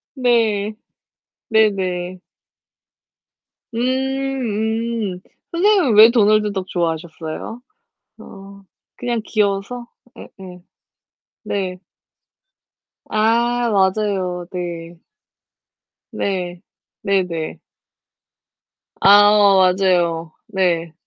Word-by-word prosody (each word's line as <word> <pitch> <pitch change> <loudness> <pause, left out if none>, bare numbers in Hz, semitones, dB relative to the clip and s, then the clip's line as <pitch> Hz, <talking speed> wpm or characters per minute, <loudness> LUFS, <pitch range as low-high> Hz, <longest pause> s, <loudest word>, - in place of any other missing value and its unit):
네. 225 -5 +1 0.8
네네. 185 -4 0 1.6
음 235 -4 -1
음. 180 - -10 0.3
선생님은 350 - +3
왜 220 +2 +9
도널드 215 -2 +3
덕 190 -1 -4
좋아하셨어요? 165 +5 -4 0.6
어 195 0 -13 0.3
그냥 240 -2 -2
귀여워서? 210 +3 -1 0.4
예예. 180 -3 -13 0.8
네. 185 -2 -3 1.3
아 235 +2 +1
맞아요. 190 -2 0
네. 170 -2 -6 1.1
네. 180 -3 -3 0.4
네네. 180 -5 -2 1.4
아. 205 +1 +7 0.5
맞아요. 170 -3 +1 0.2
네. 175 -5 -1
200 Hz, 120 characters per minute, -19 LUFS, 180-230 Hz, 1.6 s, 왜